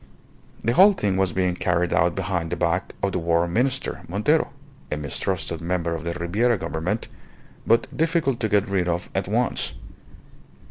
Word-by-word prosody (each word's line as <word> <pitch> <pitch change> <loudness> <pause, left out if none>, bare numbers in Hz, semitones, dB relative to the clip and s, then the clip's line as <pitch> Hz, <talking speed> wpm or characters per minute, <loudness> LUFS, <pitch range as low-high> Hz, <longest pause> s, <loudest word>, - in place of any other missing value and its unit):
The 115 - +1
whole 195 +8 +7
thing 100 - 0
was 95 -2 +1
being 90 0 +1
carried 90 -1 0
out 85 +1 +2
behind 90 -3 -2
the 85 - -1
back 85 +1 -1
of 100 - +2
the 90 - -1
War 85 0 +2
Minister, 125 +9 -1
Montero, 105 - +1 0.4
a 75 - -1
mistrusted 80 +3 -3
member 85 -1 -1
of 80 -1 -4
the 85 0 -2
Ribiera 100 +8 +1
Government, 90 +5 -3 0.6
but 115 +1 +4
difficult 160 -6 +1
to 110 - 0
get 105 -1 +2
rid 95 -3 0
of 85 0 -2
at - - -1
once. - - 0
90 Hz, 170 wpm, -24 LUFS, 85-110 Hz, 0.6 s, whole